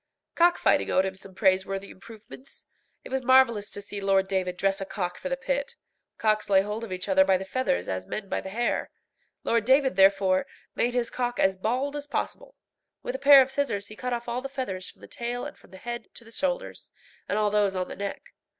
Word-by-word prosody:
Cockfighting 345 Hz, +1 st, +3 dB
owed 190 Hz, -, +3 dB
him 190 Hz, 0 st, -3 dB
some 190 Hz, 0 st, -10 dB
praiseworthy 195 Hz, 0 st, +1 dB
improvements. 225 Hz, +6 st, -13 dB, 0.4 s
It -, -, -11 dB
was 265 Hz, 0 st, 0 dB
marvellous 255 Hz, -5 st, +4 dB
to 205 Hz, -, -7 dB
see 200 Hz, 0 st, -6 dB
Lord 195 Hz, -1 st, +2 dB
David 185 Hz, -2 st, -1 dB
dress 195 Hz, +1 st, +1 dB
a -, -, -2 dB
cock 180 Hz, -3 st, -4 dB
for 275 Hz, -, -4 dB
the 270 Hz, -, -1 dB
pit. 275 Hz, +1 st, -2 dB, 0.4 s
Cocks 215 Hz, -1 st, +1 dB
lay 190 Hz, -1 st, +6 dB
hold 210 Hz, +3 st, -4 dB
of 225 Hz, -, -7 dB
each 185 Hz, +1 st, -4 dB
other 190 Hz, -1 st, +5 dB
by 190 Hz, -1 st, +3 dB
the 190 Hz, -, -6 dB
feathers, 190 Hz, -, -1 dB
as 95 Hz, 0 st, -3 dB
men 210 Hz, -2 st, -5 dB
by -, -, -2 dB
the 190 Hz, -, -7 dB
hair. 235 Hz, +5 st, -1 dB, 0.5 s
Lord 230 Hz, -1 st, +2 dB
David, 265 Hz, -2 st, +3 dB
therefore, 195 Hz, +2 st, +4 dB, 0.3 s
made 245 Hz, +1 st, 0 dB
his 240 Hz, -1 st, 0 dB
cock 245 Hz, -1 st, -2 dB
as 190 Hz, 0 st, +3 dB
bald 250 Hz, +9 st, -1 dB
as 290 Hz, 0 st, -5 dB
possible. -, -, -4 dB, 0.5 s
With -, -, -3 dB
a 265 Hz, -, -4 dB
pair 275 Hz, -1 st, +9 dB
of 260 Hz, -, -9 dB
scissors 265 Hz, -8 st, -2 dB
he 215 Hz, -, -10 dB
cut 250 Hz, +3 st, -4 dB
off 240 Hz, 0 st, -3 dB
all 240 Hz, +1 st, -2 dB
the 275 Hz, -, -5 dB
feathers 225 Hz, -9 st, -4 dB
from -, -, -19 dB
the -, -, -11 dB
tail 240 Hz, +1 st, -4 dB
and -, -, -7 dB
from -, -, -21 dB
the 190 Hz, -, -12 dB
head 240 Hz, +4 st, -6 dB
to 235 Hz, -, -9 dB
the 225 Hz, -, -15 dB
shoulders, 270 Hz, +2 st, -3 dB, 0.4 s
and 205 Hz, -, 0 dB
all 210 Hz, -1 st, +2 dB
those 205 Hz, -2 st, +2 dB
on 185 Hz, 0 st, -1 dB
the -, -, -7 dB
neck. 200 Hz, 0 st, -6 dB
215 Hz, 225 wpm, -27 LUFS, 190-255 Hz, 0.5 s, pair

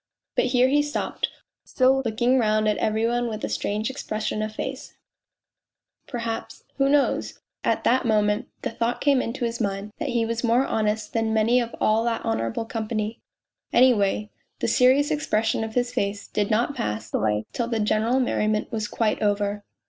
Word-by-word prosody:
..." -, -, -65 dB
But -, -, +3 dB
here 250 Hz, 0 st, +3 dB
he 290 Hz, +2 st, +3 dB
stopped, 295 Hz, 0 st, -2 dB, 0.3 s
still 265 Hz, +1 st, +3 dB
looking 240 Hz, +3 st, +2 dB
round 215 Hz, -1 st, +2 dB
at 210 Hz, -, +2 dB
every 220 Hz, +1 st, +1 dB
one 240 Hz, +1 st, 0 dB
with 215 Hz, -2 st, -5 dB
a -, -, -5 dB
strange 215 Hz, +4 st, -1 dB
expression 215 Hz, -5 st, -3 dB
of 215 Hz, 0 st, -4 dB
face; 265 Hz, 0 st, -5 dB, 1.1 s
perhaps 230 Hz, -3 st, -5 dB
who 275 Hz, -1 st, +3 dB
knows? 290 Hz, 0 st, +1 dB, 0.3 s
at -, -, +1 dB
that 255 Hz, +2 st, +3 dB
moment 210 Hz, -2 st, +1 dB, 0.2 s
the -, -, -2 dB
thought 230 Hz, +1 st, -1 dB
came 280 Hz, -3 st, +3 dB
into 240 Hz, +1 st, -3 dB
his 235 Hz, 0 st, -3 dB
mind 200 Hz, 0 st, -2 dB
that -, -, -2 dB
he 235 Hz, -1 st, +1 dB
was 230 Hz, +1 st, -3 dB
more 240 Hz, +3 st, +3 dB
honest 215 Hz, -1 st, -1 dB
than 225 Hz, -1 st, 0 dB
many 225 Hz, +3 st, +4 dB
of 235 Hz, -1 st, -3 dB
all 220 Hz, +1 st, +3 dB
that 230 Hz, -1 st, -1 dB
honourable 225 Hz, -, -1 dB
company.... 220 Hz, -1 st, -3 dB, 0.5 s
Any 255 Hz, +1 st, +6 dB
way, 205 Hz, 0 st, 0 dB, 0.3 s
the -, -, -1 dB
serious 265 Hz, +3 st, +4 dB
expression 220 Hz, -7 st, 0 dB
of 220 Hz, 0 st, -6 dB
his 245 Hz, 0 st, 0 dB
face 200 Hz, 0 st, -2 dB
did 205 Hz, -1 st, -1 dB
not 235 Hz, +6 st, +1 dB
pass 105 Hz, -, -4 dB
away 105 Hz, 0 st, 0 dB
till 235 Hz, -, -1 dB
the 230 Hz, -2 st, -1 dB
general 220 Hz, +4 st, +2 dB
merriment 215 Hz, -4 st, 0 dB
was 215 Hz, -2 st, -2 dB
quite 215 Hz, 0 st, 0 dB
ov 205 Hz, -1 st, +2 dB
r. 205 Hz, 0 st, -2 dB
225 Hz, 185 wpm, -24 LUFS, 215-245 Hz, 1.1 s, Any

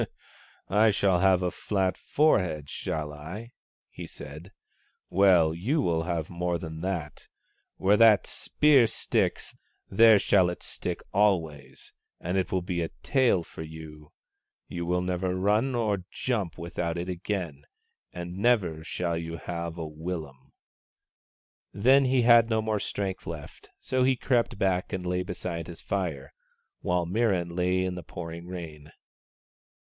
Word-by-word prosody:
" -, -, -29 dB
I 110 Hz, -, +6 dB
shall 100 Hz, -3 st, +2 dB
have 95 Hz, -1 st, +4 dB
a 90 Hz, -, 0 dB
flat 95 Hz, -3 st, -1 dB
forehead, 90 Hz, -, +1 dB
shall 75 Hz, -1 st, -4 dB
I? 90 Hz, +11 st, -8 dB, 0.2 s
" -, -, -72 dB
he -, -, -8 dB
said. 75 Hz, +7 st, -10 dB, 0.3 s
" -, -, -37 dB, 0.3 s
Well, 90 Hz, -4 st, +5 dB
you 115 Hz, -, 0 dB
will 80 Hz, -7 st, 0 dB
have 85 Hz, -2 st, -2 dB
more 85 Hz, 0 st, -1 dB
than 80 Hz, -1 st, -7 dB
that. 85 Hz, -5 st, -4 dB, 0.5 s
Where 100 Hz, +2 st, +3 dB
that 110 Hz, -2 st, +6 dB
spear 140 Hz, -6 st, +3 dB
sticks, -, -, -1 dB, 0.3 s
there 110 Hz, +2 st, +7 dB
shall 95 Hz, -3 st, +3 dB
it 90 Hz, -, -6 dB
stick -, -, -5 dB
always, 80 Hz, -9 st, 0 dB, 0.3 s
and 90 Hz, +2 st, -3 dB
it 95 Hz, -2 st, 0 dB
will 95 Hz, -2 st, 0 dB
be 90 Hz, -1 st, -2 dB
a 80 Hz, -, -2 dB
tail 130 Hz, -, +3 dB
for -, -, -10 dB
you. 80 Hz, -1 st, -10 dB, 0.6 s
You 85 Hz, -1 st, -4 dB
will 90 Hz, +1 st, +1 dB
never 90 Hz, 0 st, -1 dB
run 105 Hz, +7 st, +1 dB
or 105 Hz, -6 st, 0 dB
jump 105 Hz, -10 st, -2 dB
without 85 Hz, 0 st, -3 dB
it 85 Hz, +2 st, -4 dB
again 85 Hz, -5 st, -4 dB, 0.2 s
— -, -, -45 dB
and 90 Hz, +1 st, -6 dB
never 95 Hz, -8 st, +1 dB
shall 85 Hz, 0 st, -2 dB
you 85 Hz, 0 st, -5 dB
have 85 Hz, -1 st, -5 dB
a 80 Hz, -, -4 dB
willum." 75 Hz, -4 st, -7 dB, 1.2 s
Then 130 Hz, +7 st, +5 dB
he 130 Hz, -1 st, +3 dB
had 115 Hz, -1 st, +6 dB
no 110 Hz, -1 st, +1 dB
more 110 Hz, -1 st, -1 dB
strength 95 Hz, -1 st, -4 dB
left, 80 Hz, -3 st, -8 dB
so 130 Hz, -1 st, 0 dB
he 130 Hz, 0 st, +3 dB
crept 120 Hz, -3 st, 0 dB
back 95 Hz, -2 st, 0 dB
and 90 Hz, -1 st, -3 dB
lay 90 Hz, 0 st, 0 dB
beside 90 Hz, -2 st, -5 dB
his 85 Hz, -2 st, -9 dB
fire, 80 Hz, -9 st, -3 dB, 0.5 s
while 90 Hz, -1 st, 0 dB
Mirran 90 Hz, -3 st, 0 dB
lay 90 Hz, +1 st, +1 dB
in 95 Hz, -1 st, -2 dB
the 90 Hz, -1 st, -7 dB
pouring 85 Hz, 0 st, -8 dB
rain. 80 Hz, -4 st, -8 dB
90 Hz, 155 wpm, -27 LUFS, 85-100 Hz, 1.2 s, there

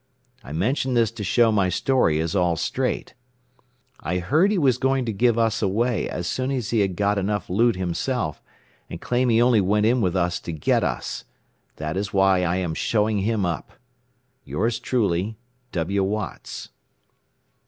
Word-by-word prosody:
I 70 Hz, -, -10 dB
mention 125 Hz, -, 0 dB
this 115 Hz, -2 st, +3 dB
to 115 Hz, -2 st, -6 dB
show 115 Hz, +4 st, +3 dB
my 100 Hz, -3 st, +2 dB
story 105 Hz, -, +2 dB
is 80 Hz, +2 st, -1 dB
all 90 Hz, -3 st, +2 dB
straight. 125 Hz, -, -2 dB, 0.9 s
"I 90 Hz, -, -2 dB
heard 155 Hz, -, +2 dB
he 210 Hz, -, +1 dB
was 130 Hz, -7 st, +2 dB
going 135 Hz, -1 st, +1 dB
to 115 Hz, -, -2 dB
give 115 Hz, +3 st, +2 dB
us 115 Hz, -2 st, +1 dB
away 110 Hz, +2 st, 0 dB
as 90 Hz, -, -4 dB
soon 130 Hz, +8 st, -2 dB
as 130 Hz, -5 st, -2 dB
he 115 Hz, -, +2 dB
had 95 Hz, -3 st, +1 dB
got 100 Hz, +2 st, +1 dB
enough 100 Hz, -2 st, -2 dB
loot 115 Hz, +5 st, +3 dB
himself, 90 Hz, -, -2 dB, 0.5 s
and -, -, -7 dB
claim 125 Hz, +1 st, 0 dB
he 115 Hz, -1 st, +4 dB
only 120 Hz, -3 st, +4 dB
went 105 Hz, +3 st, +2 dB
in 120 Hz, +2 st, +3 dB
with 90 Hz, -3 st, 0 dB
us 90 Hz, -1 st, 0 dB
to -, -, -6 dB
get 75 Hz, -, +1 dB
us. -, -, -3 dB, 0.5 s
That 75 Hz, +3 st, -4 dB
is 100 Hz, +1 st, -2 dB
why 95 Hz, -1 st, +4 dB
I 85 Hz, 0 st, +1 dB
am 90 Hz, -3 st, -1 dB
showing 105 Hz, +4 st, +1 dB
him 105 Hz, 0 st, 0 dB
up. 85 Hz, -2 st, -4 dB, 0.7 s
"Yours 115 Hz, +3 st, -1 dB
truly, 110 Hz, -4 st, 0 dB, 0.3 s
"W. 95 Hz, +3 st, 0 dB
Watts." 105 Hz, +2 st, -4 dB
105 Hz, 175 wpm, -23 LUFS, 90-120 Hz, 0.9 s, he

